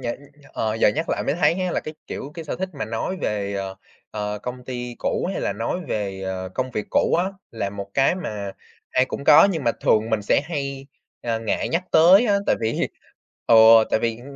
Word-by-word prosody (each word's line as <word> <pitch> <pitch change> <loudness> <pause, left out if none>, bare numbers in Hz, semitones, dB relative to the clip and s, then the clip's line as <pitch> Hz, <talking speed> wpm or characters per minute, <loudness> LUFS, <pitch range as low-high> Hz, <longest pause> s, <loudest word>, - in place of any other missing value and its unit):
nh - - -14 0.2
nh 145 -1 -19 0.2
ờ, 110 -1 -1
giờ 110 - +4
nhắc 155 +10 -2
lại - - -1
mới - - +1
thấy 170 0 +3
á 185 0 -2
là, - - 0
cái, 155 - -8
kiểu, 140 - -6
cái 165 - -7
sở 150 - -4
thích 190 +1 -3
mà 140 - -4
nói 115 - -3
về, 100 -1 -2
ờ, 95 -1 -4 0.3
ờ 105 -1 -3
công 125 0 -6
ty 125 -1 -5
cũ - - -1
hay - - -3
là - - -1
nói 115 - -3
về, 95 -2 -3
ờ, 95 -1 -4
công 130 0 -2
việc 105 -3 -4
cũ - - +2
á, 175 - +2 0.3
là 105 -4 -3
một 100 0 -7
cái 135 +4 +3
mà 105 - -5 0.4
ai 130 - +3
cũng 135 - -6
có 150 +3 +8
nhưng 160 -7 -3
mà 115 - +3
thường 110 +1 +2
mình 110 -2 0
sẽ 100 - +3
hay, 140 -4 -4 0.4
à, 115 -1 -1
ngại 110 -2 -2
nhắc 170 +3 -1
tới 185 +8 +7
á, 205 -2 +3
tại - - +3
vì, 110 0 -1 0.6
ừ, 115 - +5 0.4
tại - - +2
vì, 115 -1 -1
ưm, 120 - -13
120 Hz, 235 wpm, -23 LUFS, 105-150 Hz, 0.6 s, có